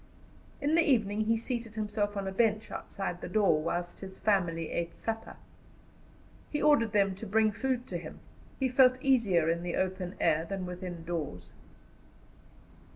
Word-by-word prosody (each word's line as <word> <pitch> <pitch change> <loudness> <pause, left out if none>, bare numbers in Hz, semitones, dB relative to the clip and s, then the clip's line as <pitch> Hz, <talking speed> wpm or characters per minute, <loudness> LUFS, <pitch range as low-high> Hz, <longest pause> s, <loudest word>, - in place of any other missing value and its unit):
In 290 +2 0
the 335 - +6
evening 215 -8 +2
he 225 +1 +2
seated 230 -1 -4
himself 210 -1 -1
on 195 -1 -2
a - - -2
bench 215 +1 +1
outside 185 -3 -5
the - - -5
door, 185 -6 +3
whilst 175 +2 -3
his 190 -1 -9
family 175 -6 +1
ate 170 0 -3
supper. 225 0 -4 1.1
He 295 - -2
ordered 290 -8 +4
them 200 -2 +3
to 200 +4 -8
bring 215 +2 +3
food 250 +3 -1
to - - -4
him. - - -9 0.4
He 265 - +2
felt 255 0 +5
easier 225 -12 +3
in 165 +1 +1
the 175 0 -3
open 185 0 -2
air 160 -1 +3
than 190 +1 -4
within 180 -1 -6
doors. 145 - -5
205 Hz, 160 wpm, -30 LUFS, 175-230 Hz, 1.1 s, the